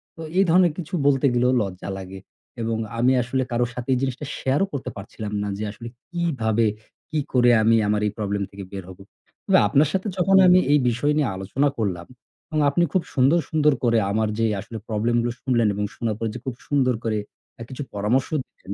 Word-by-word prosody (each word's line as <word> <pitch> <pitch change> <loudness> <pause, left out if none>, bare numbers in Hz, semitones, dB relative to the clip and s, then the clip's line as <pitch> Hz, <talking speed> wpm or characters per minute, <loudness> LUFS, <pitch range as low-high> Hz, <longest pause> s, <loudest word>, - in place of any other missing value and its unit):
তো 165 - -10 0.2
এই 195 - +6
ধরনের 175 0 +5
কিছু 165 -2 -7
বলতে 140 0 +3
গেলেও 125 +1 +3
লজ্জা 95 -2 -5
লাগে 95 0 -8 0.4
এবং 115 0 -1 0.2
আমি 125 +2 +4
আসলে 130 +2 -1
কারো 120 +1 +1
সাথে 125 +1 -6
এই - - +2
জিনিসটা 135 +2 -3
share 135 +5 0
ও - - -15
করতে 140 - -4
পারছিলাম 105 +1 -7
না - - -3
যে 105 - -4
আসলে 115 +3 -9 0.2
কিভাবে, 130 -11 0 0.5
কি 155 - 0
করে 120 -1 +5
আমি 115 +1 +5
আমার 105 0 +1
এই - - -2
problem 100 -1 -2
থেকে 100 0 -8
বের 100 -1 -6
হব। 95 - -11 0.5
তবে - - +5
আপনার 140 +8 +3
সাথে 190 +2 -1
যখন 190 +2 +4
আমি 180 0 +7
এই 150 - +5
বিষয় 120 +5 0
নিয়ে 145 -5 +2
আলোচনা 100 +10 0
করলাম 95 -6 -2 0.4
এবং 155 - -2
আপনি 160 +5 +2
খুব 185 - +2
সুন্দর, 135 +6 +4
সুন্দর 150 -2 +3
করে 115 -1 +3
আমার 110 +1 +1
যে 115 - +3
আসলে 110 +3 -7
problem 115 +2 0
গুলো 120 +1 -1
শুনলেন 120 -4 +2
এবং 105 +1 -2
শোনার 115 -2 -2
পরে 115 - -1
যে - - -5
খুব 130 -3 -4
সুন্দর 130 -4 +2
করে 110 -2 0 0.4
অ্যা 115 - -9
কিছু 130 +2 -5
পরামর্শ 110 +6 +1 0.2
দিলেন, 100 - -10
120 Hz, 210 wpm, -23 LUFS, 105-145 Hz, 0.5 s, আমি